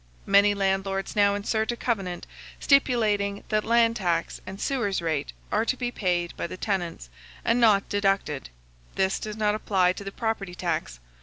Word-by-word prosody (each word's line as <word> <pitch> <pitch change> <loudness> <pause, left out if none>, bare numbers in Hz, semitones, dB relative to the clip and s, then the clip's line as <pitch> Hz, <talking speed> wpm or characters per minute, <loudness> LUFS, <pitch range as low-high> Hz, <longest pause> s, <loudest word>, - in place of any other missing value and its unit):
Many 200 +1 +5
landlords 195 0 -1
now 200 -1 +4
insert 220 +2 -1
a - - -3
covenant, 195 -8 -2 0.3
stipulating 215 -7 +2
that 215 -1 +1
land 230 0 +3
tax 170 -4 -1
and 195 +1 -7
sewers 230 -8 0
rate 160 -4 -2 0.2
are 215 - +2
to 255 +2 -1
be 245 -1 -2
paid 175 -5 -1
by - - -3
the 185 - -8
tenants, 175 - -3 0.3
and 235 +2 +2
not 210 -4 +4
deducted: 195 -8 0 0.5
this 190 0 +1
does 215 0 -6
not 210 -1 +2
apply 190 -4 +2
to 200 - -8
the 195 - -6
property 205 -5 -3
tax. 165 - -3
200 Hz, 165 wpm, -26 LUFS, 185-220 Hz, 0.5 s, Many